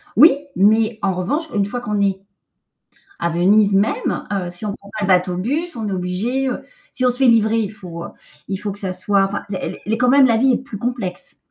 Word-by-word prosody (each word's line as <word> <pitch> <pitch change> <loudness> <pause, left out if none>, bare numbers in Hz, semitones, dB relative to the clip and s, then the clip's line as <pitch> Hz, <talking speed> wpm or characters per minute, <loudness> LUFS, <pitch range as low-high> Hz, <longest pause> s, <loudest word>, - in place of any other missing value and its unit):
Oui, 295 +8 +8 0.2
mais 215 +2 +3
en 190 -1 +1
revanche, 195 - -1
une 200 -1 +1
fois 240 +4 -4
qu'on 210 -3 -2
est, 195 -1 +1 1.0
à 170 - +1
Venise 200 +4 +3
même, 200 +3 0
heu, 185 -3 -2
si 175 +5 -8
on 200 - -2
prend 200 - -16
pas 210 - -2
le - - 0
bateau-bus, 190 - 0
on 220 -3 -4
est - - -4
obligé 195 +9 -1
heu, 255 - -3 0.3
si 255 - 0
on 250 - +5
se 245 - 0
fait 270 - +3
livrer, 225 -1 +4
il 210 -1 -2
faut 175 -5 -8
heu, - - -8 0.4
il 195 - -2
faut 205 0 -4
que 200 - -9
ça 185 -2 -3
soit, 195 +2 +1
enfin 200 +1 -2
d 190 - -3
elle - - -3
est - - -16
elle 220 - -1
est - - +1
quand 250 +1 +2
même 275 0 +6
la 230 -1 +3
vie 260 +2 +3
est - - +2
plus 235 -5 -8
complexe. 220 -6 -4
205 Hz, 250 wpm, -20 LUFS, 190-240 Hz, 1.0 s, Oui